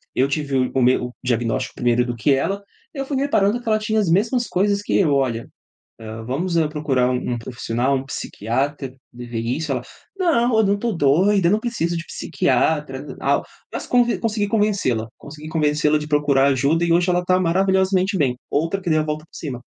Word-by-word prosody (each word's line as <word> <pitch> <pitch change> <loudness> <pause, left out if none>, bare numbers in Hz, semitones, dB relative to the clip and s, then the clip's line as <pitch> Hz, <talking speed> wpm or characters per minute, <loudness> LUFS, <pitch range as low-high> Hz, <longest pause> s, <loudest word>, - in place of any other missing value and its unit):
Eu 130 - +3
tive 140 -1 -2
o 130 -1 +1
o 135 - +1
meu 125 0 +3
o 125 - -12
diagnóstico 120 -2 -1
primeiro 120 0 +1
do 120 -1 -3
que 120 +5 +1
ela, 195 +9 -1 0.3
eu 275 -3 -4
fui 275 0 -2
reparando 240 -5 +1
que 240 - -16
ela 215 -1 +2
tinha 215 0 0
as 200 -5 +1
mesmas 230 +8 +1
coisas 200 +2 +1
que - - 0
eu, 160 -7 +3
olha, 125 -4 0 0.5
hã, 110 0 -7
vamos, 165 +9 -2
eh, 160 -2 +2
procurar 140 -5 0
um 125 0 -2
um - - -4
profissional, 120 +2 -1
um 130 - -3
psiquiatra, 135 +2 -3 0.2
de 120 0 -9
ver 120 -1 -4
isso, 135 +6 -2
ela: 125 -2 -2 0.3
"Não, 255 - +2
eu 220 - +4
não 200 0 +1
tô 235 +2 -1
doida, 170 +5 +3
eu - - +3
não 210 - +3
preciso 190 -8 -2
de 165 - -4
psiquiatra", 140 -1 0
tal, 140 +1 +1 0.3
mas - - -5
conv 245 -1 +3
consegui 215 -2 0
convencê-la, 200 - 0
consegui 150 +1 -10
convencê-la 150 -1 +2
de 150 - -6
procurar 145 -2 +3
ajuda 140 +6 +1
e 170 - +2
hoje 175 +2 +3
ela 180 0 +1
tá 185 +1 +2
maravilhosamente 190 +2 +2
bem, 130 -7 +1
outra 165 +6 0
que 180 -3 -3
deu 155 0 +3
a - - -1
volta 155 0 -4
por - - -25
cima. 135 -6 -5
155 Hz, 210 wpm, -21 LUFS, 130-195 Hz, 0.5 s, eu